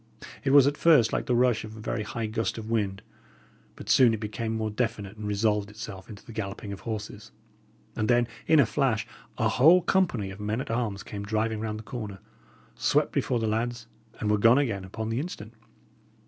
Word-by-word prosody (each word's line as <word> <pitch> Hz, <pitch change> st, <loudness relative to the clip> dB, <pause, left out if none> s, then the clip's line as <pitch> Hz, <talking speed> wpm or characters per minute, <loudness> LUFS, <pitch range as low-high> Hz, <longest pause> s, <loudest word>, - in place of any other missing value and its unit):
It -, -, 0 dB
was 140 Hz, -1 st, +7 dB
at 145 Hz, +1 st, +1 dB
first 150 Hz, -10 st, +5 dB
like -, -, -1 dB
the 125 Hz, -, +2 dB
rush 125 Hz, -2 st, +3 dB
of 110 Hz, 0 st, -9 dB
a -, -, -9 dB
very 110 Hz, +1 st, -3 dB
high 110 Hz, +2 st, -4 dB
gust 110 Hz, +1 st, -2 dB
of 110 Hz, 0 st, -6 dB
wind, 100 Hz, -4 st, -1 dB, 0.7 s
but -, -, -11 dB
soon 120 Hz, -4 st, +5 dB
it -, -, -7 dB
became 110 Hz, +1 st, -3 dB
more 110 Hz, -1 st, -2 dB
definite, 110 Hz, -3 st, -3 dB
and 105 Hz, -1 st, -6 dB
resolved 105 Hz, 0 st, +1 dB
itself 105 Hz, -3 st, -9 dB
into 105 Hz, -2 st, -11 dB
the 125 Hz, -, -10 dB
galloping 100 Hz, -1 st, -5 dB
of 100 Hz, -, -8 dB
horses; 110 Hz, -1 st, -6 dB, 0.6 s
and 110 Hz, -, -1 dB
then, 120 Hz, -1 st, +3 dB, 0.2 s
in 160 Hz, -, +5 dB
a 140 Hz, -, +6 dB
flash, 115 Hz, -4 st, 0 dB, 0.3 s
a -, -, +2 dB
whole 165 Hz, +8 st, +5 dB
company 145 Hz, -, +1 dB
of 95 Hz, -, -10 dB
men 105 Hz, +3 st, -2 dB
at 130 Hz, -, -4 dB
arms 115 Hz, -4 st, -2 dB
came 100 Hz, -, -7 dB
driving 110 Hz, +1 st, -1 dB
round 110 Hz, -1 st, -3 dB
the 110 Hz, -, -9 dB
corner, 105 Hz, -5 st, -6 dB, 0.6 s
swept -, -, +1 dB
before 125 Hz, -, 0 dB
the 115 Hz, -, -1 dB
lads, 120 Hz, +2 st, -2 dB, 0.3 s
and 105 Hz, -2 st, 0 dB
were 105 Hz, -, +2 dB
gone 115 Hz, +4 st, +6 dB
again 110 Hz, -9 st, 0 dB
upon 110 Hz, +4 st, -5 dB
the 115 Hz, +2 st, -1 dB
instant. 120 Hz, -9 st, -6 dB
110 Hz, 205 wpm, -27 LUFS, 105-120 Hz, 0.7 s, was